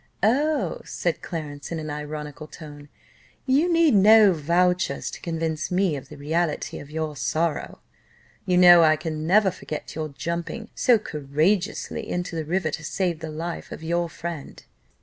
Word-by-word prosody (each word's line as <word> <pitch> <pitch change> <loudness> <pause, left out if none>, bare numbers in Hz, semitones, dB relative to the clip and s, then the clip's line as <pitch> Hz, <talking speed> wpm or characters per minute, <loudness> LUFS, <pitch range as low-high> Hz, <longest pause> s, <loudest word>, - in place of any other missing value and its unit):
"Oh," 290 +8 +1
said - - -2
Clarence, 150 -4 -6
in 165 - -2
an 155 -1 -5
ironical 150 0 -6
tone, 145 -3 -11 0.6
"you 290 +7 +3
need 330 -4 +4
no 210 0 +7
vouchers 175 0 +1
to - - -9
convince 160 -2 -2
me 180 -3 +1
of 135 - -8
the 150 - -11
reality 155 +2 -2
of 140 - -11
your 155 -1 -3
sorrow. 160 +3 -2 0.7
You 180 -1 +3
know 175 -1 +9
I 155 -1 +5
can 155 0 -4
never 195 +1 +4
forget 155 -4 -7
your 155 -1 -4
jumping 170 +9 -5
so 245 -2 +4
courageously 165 +4 -1
into 175 -1 -3
the 160 -1 -3
river, 165 0 -1
to 155 - -5
save 175 0 -1
the 160 -1 -6
life 165 +2 -5
of - - -8
your 170 +1 0
friend." 165 -3 -7
165 Hz, 160 wpm, -24 LUFS, 155-185 Hz, 0.7 s, know